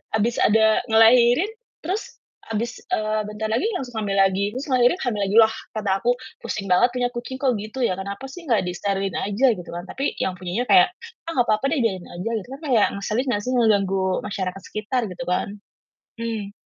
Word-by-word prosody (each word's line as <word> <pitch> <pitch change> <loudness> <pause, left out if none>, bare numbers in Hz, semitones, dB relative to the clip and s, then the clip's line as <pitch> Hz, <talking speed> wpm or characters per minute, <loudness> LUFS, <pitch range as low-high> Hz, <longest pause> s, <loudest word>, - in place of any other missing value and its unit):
habis 230 +2 +1
ada 220 0 +4
ngelahirin 240 - +5 0.3
terus 380 +6 -4 0.3
habis 225 +2 -3
eee, 215 0 0
bentar 210 +1 -4
lagi 245 - +1
langsung 250 -8 -5
hamil 200 -2 -1
lagi, 195 +1 +2
terus 265 - -3
ngelahirin, 250 +7 +3
hamil 215 -5 -1
lagi, 205 - -1
lah 220 0 +1 0.2
kata 215 -2 -2
aku, 245 - +2 0.3
"Pusing 195 -2 -4
banget 240 +7 +5
punya 245 -1 +1
kucing 245 +2 -5
kok 265 -2 +2
gitu 215 +5 -7
ya, 185 - -1
kenapa 200 +5 -6
sih 335 +6 -10
nggak 220 -6 +2
disterilin 195 +1 -2
aja," 205 +7 +1
gitu 180 -1 -10
kan, 175 +1 -5
tapi 275 - -2
yang 185 - -1
punya 180 +6 -3
kayak, 365 -1 +6 0.4
"Ah - - -2
gak - - -15
papa 245 +7 +1
deh 310 - +1
biarin 190 -5 -1
aja," 180 +6 -5
gitu 210 - -11
kan - - -26
kayak 230 -5 +4
ngeselin 215 +6 -1
nggak 205 -2 0
sih 255 - -2
ngeganggu 200 -5 +2 0.2
masyarakat 195 -2 -4
sekitar 215 +2 -2
gitu 260 +8 -6
kan, 180 - 0 0.7
mmm. 220 -3 -4
220 Hz, 195 wpm, -23 LUFS, 195-245 Hz, 0.7 s, kayak